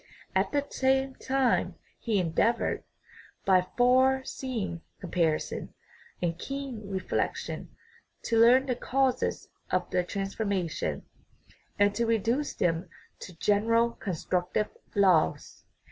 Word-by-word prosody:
At -, -, +2 dB
the 285 Hz, -1 st, 0 dB
same 265 Hz, 0 st, +1 dB
time 260 Hz, -2 st, +1 dB, 0.2 s
he 225 Hz, -4 st, 0 dB
endeavored, 190 Hz, +6 st, +1 dB, 0.6 s
by 185 Hz, -1 st, +4 dB
far 260 Hz, +2 st, +4 dB
see 260 Hz, -2 st, -5 dB
ing 170 Hz, -3 st, -5 dB, 0.2 s
comparison 170 Hz, -4 st, -1 dB, 0.5 s
and 170 Hz, -1 st, -1 dB
keen 270 Hz, -6 st, -5 dB
reflection, 190 Hz, -1 st, -2 dB, 0.5 s
to 230 Hz, -1 st, +1 dB
learn 250 Hz, +3 st, +6 dB
the 255 Hz, -2 st, -1 dB
causes 260 Hz, +1 st, 0 dB, 0.2 s
of -, -, 0 dB
the 180 Hz, -, +2 dB
transformation, 195 Hz, -3 st, -2 dB, 0.7 s
and 205 Hz, 0 st, +4 dB
to 235 Hz, +2 st, 0 dB
reduce 230 Hz, +6 st, 0 dB
them 175 Hz, 0 st, 0 dB, 0.3 s
to 180 Hz, -, -10 dB
general 230 Hz, +5 st, +3 dB
constructive 185 Hz, 0 st, -2 dB, 0.3 s
laws. 185 Hz, -, +2 dB
220 Hz, 110 wpm, -28 LUFS, 185-255 Hz, 0.7 s, learn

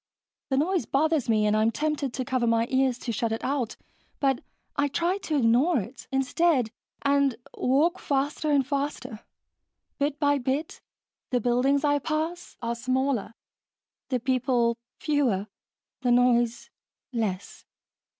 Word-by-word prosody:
The 265 Hz, -, +1 dB
noise 335 Hz, -, +1 dB
bothers 310 Hz, -2 st, +1 dB
me 215 Hz, -1 st, +3 dB
and 210 Hz, 0 st, +3 dB
I'm 215 Hz, +1 st, +3 dB
tempted 295 Hz, +1 st, -1 dB
to 255 Hz, -, -2 dB
cover 250 Hz, -2 st, 0 dB
my 230 Hz, 0 st, +3 dB
ears 260 Hz, -2 st, +2 dB
to 245 Hz, -, -4 dB
shut 230 Hz, +1 st, -1 dB
it 225 Hz, -, -3 dB
out, 265 Hz, -5 st, -1 dB, 0.4 s
but 270 Hz, -3 st, +1 dB, 0.3 s
I 285 Hz, -1 st, +2 dB
try 345 Hz, +7 st, 0 dB
to 325 Hz, -6 st, -2 dB
ignore 260 Hz, +5 st, +3 dB
it, 230 Hz, +6 st, -8 dB
instead, 270 Hz, -2 st, +2 dB, 0.3 s
and 280 Hz, -2 st, +3 dB, 0.2 s
walk 310 Hz, +8 st, +2 dB
faster 285 Hz, +2 st, -1 dB
and 280 Hz, -3 st, +3 dB
faster. 280 Hz, -5 st, -3 dB, 0.8 s
Bit 285 Hz, +1 st, 0 dB
by 285 Hz, -1 st, +3 dB
bit, 270 Hz, +5 st, -2 dB, 0.5 s
the 250 Hz, -, +1 dB
buildings 250 Hz, +5 st, +2 dB
I 290 Hz, -1 st, +3 dB
pass 320 Hz, +4 st, -3 dB
are 235 Hz, 0 st, 0 dB
smaller, 255 Hz, -1 st, -1 dB, 0.7 s
the 255 Hz, -2 st, 0 dB
people 245 Hz, -1 st, +1 dB, 0.2 s
fewer, 265 Hz, -11 st, +1 dB, 0.6 s
the 250 Hz, -, +1 dB
noise 240 Hz, -1 st, +3 dB, 0.4 s
less. 205 Hz, -5 st, -3 dB
265 Hz, 140 wpm, -27 LUFS, 235-290 Hz, 0.8 s, me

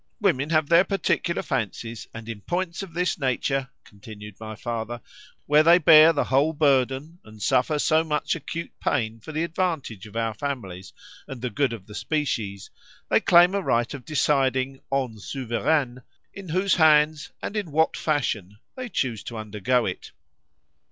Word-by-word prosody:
—Women 155 Hz, -9 st, +1 dB
have 155 Hz, -2 st, +2 dB
their 170 Hz, +3 st, +6 dB
particular 180 Hz, -2 st, -1 dB
fancies, 115 Hz, -2 st, -4 dB
and 115 Hz, 0 st, -9 dB
in 110 Hz, -3 st, -7 dB
points 175 Hz, -, -3 dB
of 180 Hz, -4 st, -9 dB
this 180 Hz, -1 st, 0 dB
nature, 135 Hz, 0 st, -1 dB
continued 105 Hz, 0 st, -12 dB
my 110 Hz, 0 st, -7 dB
father, 115 Hz, +1 st, -4 dB, 0.5 s
where 150 Hz, +1 st, +5 dB
they 170 Hz, +2 st, +6 dB
bear 160 Hz, -1 st, +8 dB
the 155 Hz, -, 0 dB
whole 140 Hz, +5 st, +2 dB
burden, 140 Hz, +2 st, +1 dB
and 110 Hz, 0 st, -15 dB
suffer 130 Hz, +8 st, +1 dB
so 155 Hz, +2 st, +3 dB
much 150 Hz, 0 st, -1 dB
acute 165 Hz, +2 st, -6 dB
pain 115 Hz, -5 st, -1 dB
for 135 Hz, -, -10 dB
the 155 Hz, +2 st, -1 dB
advantage 160 Hz, -, -3 dB
of 105 Hz, -, -15 dB
our 115 Hz, -1 st, -1 dB
families, 105 Hz, -8 st, -5 dB, 0.4 s
and 135 Hz, -, -7 dB
the 125 Hz, -, -2 dB
good 140 Hz, +2 st, +1 dB
of 110 Hz, -5 st, -7 dB
the 105 Hz, -, -12 dB
species,—they 105 Hz, -6 st, -3 dB
claim 175 Hz, +2 st, +5 dB
a 200 Hz, -, 0 dB
right 120 Hz, -8 st, 0 dB
of 140 Hz, -3 st, -8 dB
deciding, 135 Hz, -2 st, +1 dB
en 130 Hz, -5 st, -1 dB
Souveraines, 125 Hz, +3 st, -1 dB, 0.3 s
in 195 Hz, -3 st, -10 dB
whose 185 Hz, +4 st, +1 dB
hands, 150 Hz, -3 st, +4 dB
and 205 Hz, -, -5 dB
in 200 Hz, -7 st, -3 dB
what 160 Hz, +2 st, +2 dB
fashion, 110 Hz, -, -2 dB, 0.2 s
they 255 Hz, -2 st, -6 dB
choose 120 Hz, -, -2 dB
to 115 Hz, -, -6 dB
undergo 110 Hz, +3 st, 0 dB
it. 90 Hz, -, -5 dB
135 Hz, 165 wpm, -24 LUFS, 115-160 Hz, 0.5 s, bear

